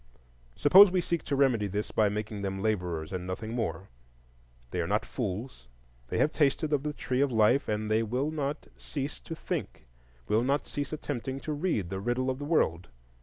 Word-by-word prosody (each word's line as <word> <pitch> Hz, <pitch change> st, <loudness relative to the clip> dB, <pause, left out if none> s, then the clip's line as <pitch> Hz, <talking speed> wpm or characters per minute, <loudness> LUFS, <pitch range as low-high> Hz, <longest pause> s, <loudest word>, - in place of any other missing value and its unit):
Suppose 190 Hz, +7 st, +8 dB
we 185 Hz, 0 st, +1 dB
seek 170 Hz, -1 st, -1 dB
to 140 Hz, -, 0 dB
remedy 125 Hz, -7 st, +3 dB
this 105 Hz, +2 st, -3 dB
by 105 Hz, -2 st, +3 dB
making 105 Hz, 0 st, -4 dB
them 95 Hz, -1 st, -3 dB
laborers 90 Hz, -5 st, -1 dB
and 90 Hz, -1 st, -4 dB
nothing 110 Hz, +5 st, -4 dB
more: 95 Hz, -6 st, -3 dB, 0.8 s
they 90 Hz, -, -1 dB
are 85 Hz, -, -2 dB
not 105 Hz, +3 st, +1 dB
fools, 105 Hz, -, -5 dB, 0.4 s
they -, -, -2 dB
have 150 Hz, -, +3 dB
tasted 150 Hz, +1 st, +1 dB
of 145 Hz, -, +2 dB
the 150 Hz, +1 st, -2 dB
Tree 130 Hz, -3 st, -1 dB
of 140 Hz, -2 st, +2 dB
Life, 115 Hz, +4 st, +3 dB
and 105 Hz, 0 st, -1 dB
they 110 Hz, +1 st, +3 dB
will 125 Hz, +7 st, -1 dB
not 145 Hz, -1 st, -3 dB
cease 140 Hz, -1 st, -5 dB
to 165 Hz, -, -7 dB
think, 65 Hz, -, -4 dB, 0.4 s
will 110 Hz, +2 st, +3 dB
not 140 Hz, +3 st, +1 dB
cease 145 Hz, -1 st, -4 dB
attempting 135 Hz, -3 st, -4 dB
to 155 Hz, -, -3 dB
read 145 Hz, -, -1 dB
the 95 Hz, -, -2 dB
riddle 120 Hz, +5 st, 0 dB
of 130 Hz, -, -5 dB
the 145 Hz, -, -4 dB
world. 90 Hz, -, +1 dB
120 Hz, 195 wpm, -29 LUFS, 100-145 Hz, 0.8 s, Suppose